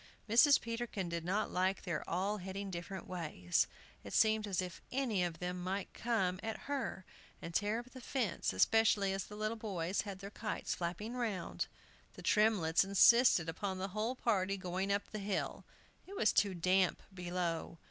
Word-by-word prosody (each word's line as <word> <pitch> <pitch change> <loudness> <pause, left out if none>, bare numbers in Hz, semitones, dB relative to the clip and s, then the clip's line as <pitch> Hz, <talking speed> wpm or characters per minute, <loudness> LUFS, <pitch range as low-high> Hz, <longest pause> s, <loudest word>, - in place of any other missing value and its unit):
Mrs. 245 +6 +7
Peterkin 230 -5 -3
did 170 -1 -3
not 195 +5 0
like 185 +2 0
their 170 -5 -2
all 195 +5 0
heading 190 +1 -5
different 180 +2 -6
ways; 150 - 0 0.4
it 100 - -8
seemed 220 -1 +4
as 190 -3 -1
if 180 -1 -4
any 245 -8 +1
of 170 -2 -2
them 180 0 -4
might 190 +2 -3
come 190 -6 0
at 220 -1 -4
her, 275 -9 -3 0.3
and 165 - -7
tear 205 +4 +1
up 240 +2 -7
the 260 - -10
fence, 240 -6 -1
especially 200 - +3
as 195 -2 -2
the 210 - -10
little 215 +1 -1
boys 190 -4 -1
had 200 -2 -6
their 200 +1 -8
kites 215 +1 -3
flapping 180 +7 -4
round. 230 -7 -2 0.5
The - - -10
Tremletts 210 -7 +4
insisted 200 -1 +6
upon 190 +3 -3
the 190 +1 -3
whole 215 +6 -2
party 195 -5 +1
going 185 +1 -2
up 200 0 +1
the 215 - -4
hill; 200 0 -2 0.4
it 395 - -9
was 220 - +3
too 205 -3 +3
damp 185 +1 +2
below. 175 -2 -3
195 Hz, 175 wpm, -35 LUFS, 180-220 Hz, 0.5 s, Mrs